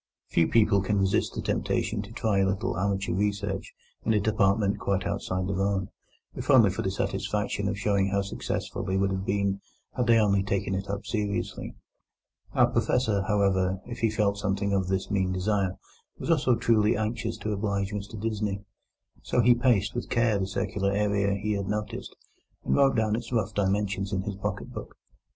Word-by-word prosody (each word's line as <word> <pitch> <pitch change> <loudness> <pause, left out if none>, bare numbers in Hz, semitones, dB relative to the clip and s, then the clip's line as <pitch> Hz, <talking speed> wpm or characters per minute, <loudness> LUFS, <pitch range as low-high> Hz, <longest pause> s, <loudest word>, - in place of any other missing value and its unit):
Few 80 - +3
people 105 -3 +4
can 100 +2 0
resist 95 -1 +1
the - - -3
temptation 105 -2 -1
to 105 +1 -10
try 110 -3 0
a 95 - +3
little 100 0 -1
amateur 100 +1 0
research 100 0 -1 0.3
in 110 - +2
a 105 - +3
department 100 -1 +2
quite 95 -1 -1
outside 90 0 -2
their 95 0 -1
own, 100 -1 0 0.4
if - - -7
only - - +7
for - - -3
the - - -1
satisfaction 105 -1 -1
of 100 0 -1
showing 100 -1 +1
how 100 0 0
successful 100 0 -4
they 95 0 -1
would 95 0 +1
have 95 0 -2
been 100 0 0 0.3
had 125 -2 0
they 115 -1 +6
only 100 -3 +3
taken 95 0 -1
it 95 +1 -3
up 100 +1 -3
seriously. 105 -3 -3 0.8
Our - - +6
Professor, 110 -6 +1
however, 95 -3 +2
if 120 - -7
he 115 -2 +2
felt 105 -1 0
something 100 0 0
of 95 -2 +1
this 95 +2 -1
mean 95 -2 +1
desire, 95 0 0 0.4
was - - -2
also 130 -6 +3
truly 115 -2 +3
anxious 110 +1 -2
to 110 - -3
oblige 100 -1 -1
Mr 105 +1 -5
Disney. 105 -2 -2 0.6
So 125 - +1
he 120 +2 +6
paced 120 -4 +2
with 120 - -4
care 115 -3 +2
the 95 - -1
circular 100 0 -1
area 100 -1 +1
he 105 +2 -2
had 100 -2 -1
noticed, 105 0 -4 0.5
and - - +1
wrote 135 -2 +4
down 110 -2 +2
its 115 +1 -5
rough 110 -4 0
dimensions 100 0 0
in 95 -1 0
his 105 0 -3
pocket 100 - -4
book. - - -8
100 Hz, 185 wpm, -27 LUFS, 95-110 Hz, 0.8 s, only